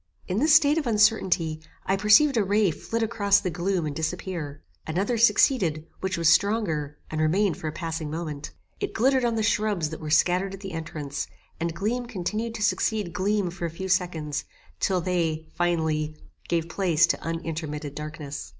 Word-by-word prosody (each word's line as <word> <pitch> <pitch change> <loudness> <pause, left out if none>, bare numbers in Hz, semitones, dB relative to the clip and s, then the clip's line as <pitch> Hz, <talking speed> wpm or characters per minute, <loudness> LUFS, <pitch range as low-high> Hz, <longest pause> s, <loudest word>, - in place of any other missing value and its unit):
In 185 +3 0
this 305 +3 +5
state 305 -1 +5
of 295 - -4
uncertainty, 190 -8 +2 0.2
I 195 - +2
perceived 210 +8 +5
a 220 - +3
ray 200 -1 +2
flit 230 +8 -3
across 200 -3 +3
the 185 -3 -3
gloom 175 +1 -1
and 145 -2 -4
disappear. 160 -2 -4 0.2
Another 190 +9 0
succeeded, 215 - +3
which 190 -1 -2
was 165 -1 +2
stronger, 165 -5 +2
and 155 0 -1
remained 180 +4 +2
for 160 - -5
a - - -2
passing 160 -1 -4
moment. 155 -2 -5 0.3
It 405 - -3
glittered 260 +2 +3
on 235 -1 +1
the 220 - 0
shrubs 210 -7 +1
that 160 - -6
were 155 - -5
scattered 180 +5 +2
at 195 - -14
the 195 -2 -6
entrance, 150 -3 -4 0.3
and 170 0 -2
gleam 240 +6 -1
continued 220 +2 -3
to 215 - -3
succeed 210 -4 0
gleam 200 -1 0
for 175 0 -5
a - - -1
few 190 +4 -6
seconds, 165 -6 0 0.3
till 185 -2 +1
they, 165 -3 -1
finally, 160 -3 0 0.3
gave 165 -1 0
place 170 -3 +3
to - - -1
unintermitted 160 -3 -4
darkness. 150 -1 -6
180 Hz, 175 wpm, -26 LUFS, 160-210 Hz, 0.3 s, this